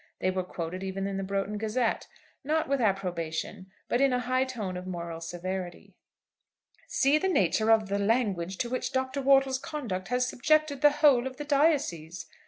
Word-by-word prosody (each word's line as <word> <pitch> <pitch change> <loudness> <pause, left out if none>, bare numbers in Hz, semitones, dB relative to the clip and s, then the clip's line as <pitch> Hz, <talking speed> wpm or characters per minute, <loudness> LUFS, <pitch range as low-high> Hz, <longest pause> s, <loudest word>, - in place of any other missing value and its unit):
They 185 - 0
were 185 0 -1
quoted 180 0 -5
even 195 0 -3
in 195 -1 -3
the 195 - -2
'Broughton 200 +2 -2
Gazette,' 225 +2 -1 0.4
not 310 +3 0
with 275 -1 0
approbation, 185 -2 -2 0.2
but 240 - +1
in 275 -1 +4
a 250 - +1
high 255 +2 +1
tone 215 -8 -5
of 180 +1 -6
moral 170 -2 -5
severity. 175 +2 -5 0.9
"See 280 +3 +3
the 380 - 0
nature 220 - +2
of 220 -2 +4
the 200 +1 -1
language 200 -5 0
to - - -5
which 255 0 -2
Dr. 260 +1 -1
Wortle's 270 -1 +4
conduct 245 - -5
has 250 +1 +1
subjected 305 +2 +1
the 295 - +7
whole 285 -4 +4
of 260 -1 -8
the 295 - -5
diocese!" 275 - +1
220 Hz, 180 wpm, -28 LUFS, 185-265 Hz, 0.9 s, the